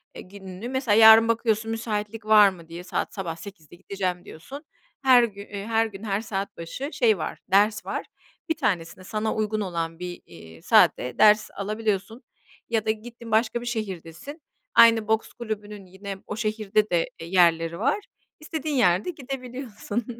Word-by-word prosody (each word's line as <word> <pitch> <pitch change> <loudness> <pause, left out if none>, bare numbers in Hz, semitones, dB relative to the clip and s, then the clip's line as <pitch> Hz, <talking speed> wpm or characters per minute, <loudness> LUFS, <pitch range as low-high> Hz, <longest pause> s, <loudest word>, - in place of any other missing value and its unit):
eee, - - -8
gününü, 190 +3 -9
mesela 260 -5 +1
yarın 225 0 +8
bakıyorsun, 225 -1 0
müsaitlik 220 -1 -4
var 215 -2 +7
mı 170 -4 -12
diye, 170 +1 -8
"Saat 180 - -3
sabah 180 -5 -4
08.00'de 165 -3 -12
gideceğim," 185 -1 -4
diyorsun. 275 - -10 0.4
Her 255 -2 +7
gün 200 -3 -5 0.2
her 225 0 +2
gün, 210 -1 -9
her 200 -1 -1
saat 200 -3 -5
başı 170 - -6
şey 220 -5 +3
var, - - -5
ders 210 +2 +3
var. - - -4 0.4
Bir 320 - +1
tanesini 180 0 -2
sana 215 +2 -2
uygun 215 0 -1
olan 165 -3 -4
bir, 180 -1 -7
iii, 80 0 -14
saatte 125 - +3
ders 215 0 +5
alabiliyorsun 215 +2 -3 0.5
ya 225 -2 0
da 220 - +3
gittin 230 +1 -9
başka 225 +2 +1
bir 240 - -8
şehirdesin. 215 - -6 0.3
Aynı 230 -2 +6
boks 220 0 0
kulübünün 210 -3 -6
yine 190 +2 -8
o - - -4
şehirde 215 -1 0
de, 170 -2 +1
e, 165 - -7
yerleri 170 -2 +2
var. 280 - +1 0.4
İstediğin 310 -1 -4
yerde 195 - +2
gidebiliyorsun 250 -6 -6
210 Hz, 160 wpm, -25 LUFS, 185-230 Hz, 0.5 s, yarın